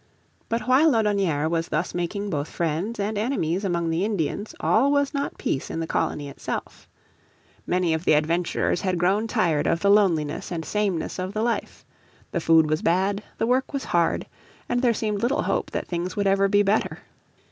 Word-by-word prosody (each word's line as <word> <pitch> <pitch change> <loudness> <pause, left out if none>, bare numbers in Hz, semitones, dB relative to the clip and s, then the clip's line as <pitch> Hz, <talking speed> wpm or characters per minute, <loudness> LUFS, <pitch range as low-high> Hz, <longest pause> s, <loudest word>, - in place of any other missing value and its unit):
But 230 +1 0
while 270 +5 +5
Laudonnière 200 -9 +1
was 165 0 -1
thus - - -2
making 200 +4 -3
both 145 -1 -2
friends 170 +7 -2
and 205 +1 -1
enemies 205 - -1
among 170 -3 0
the 165 +3 0
Indians 205 0 -2
all 265 +6 +3
was 285 0 +1
not 280 0 -3
peace 135 - -2
in - - -4
the 165 - -1
colony 150 -2 -1
itself. 140 - -6 0.8
Many 180 -2 +1
of 160 +1 -2
the - - +4
adventurers 165 +3 +1
had 185 -2 0
grown 195 +6 +1
tired 165 -8 +1
of 165 - +1
the 200 - +4
loneliness 170 -9 +2
and 165 -2 -3
sameness 195 -2 -1
of 185 +2 -3
the 215 - 0
life. 235 0 -2 0.5
The 170 - -1
food 160 -1 +5
was 155 0 0
bad, 190 +4 +1 0.2
the - - 0
work 255 +4 +1
was 275 - -2
hard, 170 -1 +1 0.4
and 245 0 0
there 245 -2 +4
seemed 210 -2 -2
little 265 +5 +1
hope - - -1
that - - -3
things 175 +1 -3
would 205 - 0
ever 195 0 +3
be 205 +1 +3
better. 205 +2 +1
190 Hz, 190 wpm, -24 LUFS, 165-215 Hz, 0.8 s, while